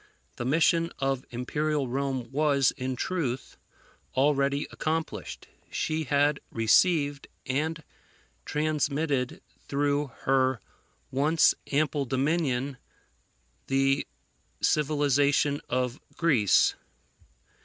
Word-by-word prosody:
The 120 - -4
mission 165 +4 +2
of 135 -1 -1
Imperial 145 +4 -1
Rome 130 -2 -2
was, 140 -2 +3
in 130 -1 -4
truth, 135 -5 -3 0.6
already 140 +1 +2
accomplished. 160 +1 -3 0.2
She 155 0 -2
had 145 +1 +2
received 145 +5 +2 0.2
and 155 +5 -2 0.6
transmitted 150 -3 -1 0.2
through 145 +1 0
her 130 -2 +2 0.5
once 150 +5 +4 0.2
ample 145 0 +1
dominion 135 -1 0 0.9
the 135 +1 +2 0.5
civilization 145 -1 +2
of 125 +1 -1 0.2
Greece. 130 - +4
140 Hz, 80 wpm, -27 LUFS, 130-150 Hz, 0.9 s, once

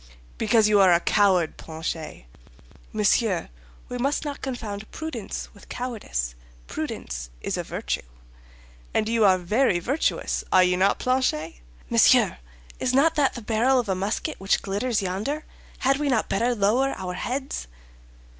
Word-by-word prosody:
"Because 220 -2 +4
you 210 -1 +4
are 190 -2 +6
a 170 - +5
coward, 185 -4 +2
Planchet." 160 - -6 0.7
"Monsieur, 210 -3 +1 0.4
we 245 - -5
must 280 +5 0
not 285 -1 -5
confound 220 -5 -5
prudence 315 0 -6
with - - -17
cowardice; 210 - -3 0.3
prudence - - -5
is - - -3
a - - -1
virtue." - - -3 0.9
"And 215 - +2
you 225 -1 +2
are 190 -2 +6
very 195 +3 +2
virtuous, 265 - -1
are 185 - +6
you 180 0 +3
not, 190 +2 +3
Planchet?" 250 -12 0 0.3
"Monsieur, - - +4 0.4
is 255 0 0
not 315 +4 +5
that 290 -4 +2
the 240 - -7
barrel 235 +5 +3
of 235 -4 -2
a - - +3
musket 200 +11 -2
which 195 +1 +1
glitters 205 +2 -1
yonder? 210 +12 -2 0.4
Had 270 +1 +3
we 290 0 -1
not 240 -5 +1
better 240 +5 +1
lower 235 +7 +2
our 185 -1 -4
heads?" 260 - -3
215 Hz, 150 wpm, -25 LUFS, 185-255 Hz, 0.9 s, are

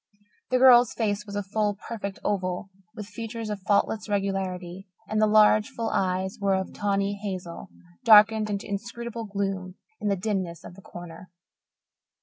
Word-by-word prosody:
The 255 - +3
girl's 250 -1 +6
face 210 -2 -1
was 200 - -7
a 205 - -1
full, 210 +1 -1
perfect 200 -2 -6
oval, 190 -1 -2 0.2
with 210 - -6
features 225 +2 -6
of 205 - -4
faultless 210 +2 0
regularity, 195 -2 -3 0.2
and 215 0 0
the 215 - +5
large, 215 0 +5
full 230 -1 -3
eyes 190 0 -1
were 195 -1 +2
of 190 0 -3
tawny 200 0 0
hazel, 185 -4 -6 0.3
darkened 215 0 +6
into 200 -1 -3
inscrutable 235 +3 -5
gloom 195 -2 -3 0.2
in 210 - -3
the 200 - +2
dimness 185 -4 -3
of - - -10
the 195 - -14
corner. 175 0 -11
200 Hz, 155 wpm, -26 LUFS, 190-215 Hz, 0.3 s, girl's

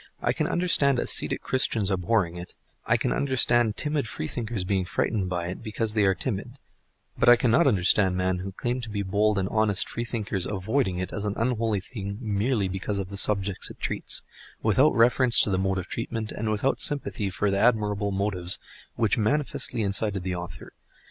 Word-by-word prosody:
I - - 0
can - - -1
understand 155 -6 +2
ascetic - - 0
Christians 110 -6 0
abhorring 90 -1 0
it, 90 0 -9 0.3
I - - +3
can - - -1
understand 120 -4 +3
timid 150 -5 -1
Freethinkers 110 +4 -4
being 95 0 0
frightened 95 +2 -1
by 90 -1 -2
it 90 - -7
because 110 -1 -3
they 105 -2 +2
are 95 -1 +3
timid; 115 +3 -4 0.7
but - - +5
I 120 - +9
cannot 125 +7 +3
understand 95 -3 +3
men 90 0 0
who 95 +1 -6
claim 120 +5 -3
to 115 - -7
be 100 -1 -3
bold 105 +2 +1
and 95 -1 0
honest 105 -4 +1
Freethinkers 110 -5 -3
avoiding 105 0 -1
it 95 0 -4
as 105 - -3
an 105 -1 -2
unholy 115 -4 0
thing 100 -2 -7
merely 105 -1 0
because 95 +2 -3
of 95 -1 -4
the 100 - -7
subjects 100 -2 +1
it - - -12
treats, - - -2 0.4
without 130 +8 +3
reference 120 +1 +5
to 105 - +2
the 95 - +1
mode 95 0 0
of 95 - -3
treatment, 115 -2 -4
and 110 0 -3
without 110 +6 0
sympathy 130 -8 +1
for 100 +2 -1
the 100 - 0
admirable 105 -3 +1
motives 95 -3 +2 0.4
which 115 +2 +1
manifestly 120 -1 -1
incited 100 -1 -1
the 95 0 -3
author. 85 -2 -8
105 Hz, 185 wpm, -26 LUFS, 95-115 Hz, 0.7 s, I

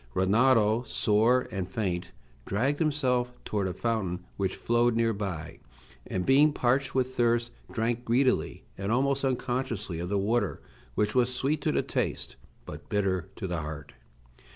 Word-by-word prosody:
Rinaldo, 110 +3 +4
sore 115 +5 +3
and 95 -3 -3
faint, 90 -4 -2 0.4
dragged 135 +9 0
himself 130 -6 +1
toward 100 -3 -1
a 90 - -3
fountain 95 -6 -2
which 95 -2 -1
flowed 120 0 +2
near 115 0 +2
by, 85 -6 -5 0.5
and, 90 -1 -2
being 145 +3 +5
parched 130 +1 +1
with 130 0 +1
thirst, 120 -1 +2 0.2
drank 115 +1 -1
greedily 125 +3 +1 0.2
and 100 +2 -2
almost 135 +3 +1
unconsciously 120 -8 -2
of 90 +1 -4
the 100 - +1
water, 105 +1 0 0.4
which 105 - +1
was 125 -1 +3
sweet 140 +4 -1
to 155 - +1
the - - +1
taste, - - -3 0.3
but - - -10
bitter 95 -3 0
to - - -5
the 90 -3 -2
heart. 75 -1 -7
115 Hz, 155 wpm, -28 LUFS, 95-125 Hz, 0.5 s, being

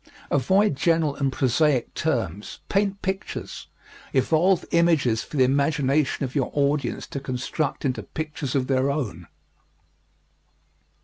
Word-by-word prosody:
Avoid 190 - +3
general 160 0 +1
and 135 -2 0
prosaic 130 +1 +1
terms. 100 +6 -2
Paint 200 0 0
pictures. 190 +1 -4 0.5
Evolve 165 +7 +3
images 155 -10 +3
for 150 - -7
the 130 - +5
imagination 140 +1 +1
of 130 - -7
your 140 -4 0
audience 140 -2 0
to 140 - -5
construct 135 +3 -3
into 130 -2 -1
pictures 150 -4 -5
of 130 -2 +1
their 130 +1 +1
own. 105 - -3
140 Hz, 120 wpm, -24 LUFS, 130-160 Hz, 0.5 s, the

